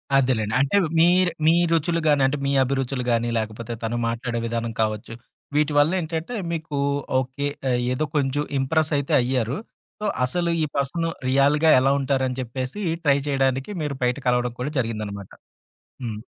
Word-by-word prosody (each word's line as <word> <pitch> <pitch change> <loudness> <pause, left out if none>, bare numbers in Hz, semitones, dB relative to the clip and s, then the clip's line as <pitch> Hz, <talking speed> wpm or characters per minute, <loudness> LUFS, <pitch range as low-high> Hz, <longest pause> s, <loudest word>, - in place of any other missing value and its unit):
అదేలేండి. 125 -5 +2
అంటే 140 +9 +2 0.2
మీరూ 175 +1 +4 0.2
మీ 165 - +6 0.2
రుచులు 165 +1 +1
గానంటే 140 -1 +3
మీ 140 - +1
అభిరుచులు 135 -1 -2
గానీ 115 0 +1
లేకపోతే 110 +1 -4
తను 115 +1 -1
మాట్లాడే 115 0 -2
విధానం 115 0 -2
కావచ్చు. 110 +1 -2 0.4
వీటి 150 0 +2
వల్లేంటంటే 165 +5 0 0.2
మీకూ 155 -3 -3 0.4
ఓకే. 130 +2 -3 0.2
ఆహ్, 125 -1 +2
ఏదో 155 +5 0
కొంచుం 145 +1 +1
ఇంప్రెసయితే 145 0 0
అయ్యారు. 125 +1 -1 0.4
సో - - -2 0.2
అసలు 170 +6 -1
ఈ - - +2
పర్సన్ 145 +5 -1 0.2
రియల్‌గా 140 +4 +4
ఎలా 135 +1 +3
ఉంటారని 130 -1 0
జెప్పేసి 130 - -4 0.2
ట్రై 140 -2 +4
చేయడానికి 135 0 0
మీరు 145 -2 -2
బయట 125 +2 +1
కలవడం 125 -1 +2
కూడా 140 +4 -2
జరిగిందనమాట. 105 -4 -4 0.7
హ్మ్. 110 -3 -4
135 Hz, 145 wpm, -23 LUFS, 120-150 Hz, 0.7 s, మీ